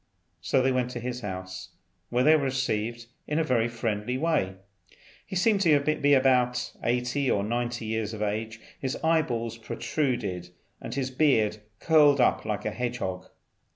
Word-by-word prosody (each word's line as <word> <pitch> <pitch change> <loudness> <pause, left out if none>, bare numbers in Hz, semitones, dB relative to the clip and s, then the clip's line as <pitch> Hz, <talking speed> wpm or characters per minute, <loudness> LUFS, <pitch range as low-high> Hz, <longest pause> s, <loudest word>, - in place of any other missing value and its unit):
So 130 - +2
they 130 - +3
went 125 -1 0
to 120 - -4
his 125 +1 -4
house, 95 -2 -6 0.4
where 125 +1 +1
they 155 +3 +6
were 145 -3 +1
received 120 -3 -2 0.2
in 150 - -1
a 165 - +3
very 120 -6 +1
friendly 115 0 -2
way. 150 - 0 0.7
He - - -6
seemed 200 +2 +3
to 155 -6 +5
be 145 0 +2
about 125 -2 +2
eighty 125 +3 0
or 100 - +1
ninety 120 +1 -2
years 110 -1 -2
of 110 -1 -4
age; 110 +2 -3 0.2
his 135 +1 -2
eye 160 0 +4
balls 115 -4 -4
protruded, 110 - -2 0.3
and - - -6
his 130 -1 -2
beard 125 -7 +2 0.2
curled 150 -3 +5
up 125 - +2
like 105 -1 -3
a 110 - 0
hedge 125 +2 -3
hog. 95 -5 -4
125 Hz, 170 wpm, -27 LUFS, 110-140 Hz, 0.7 s, they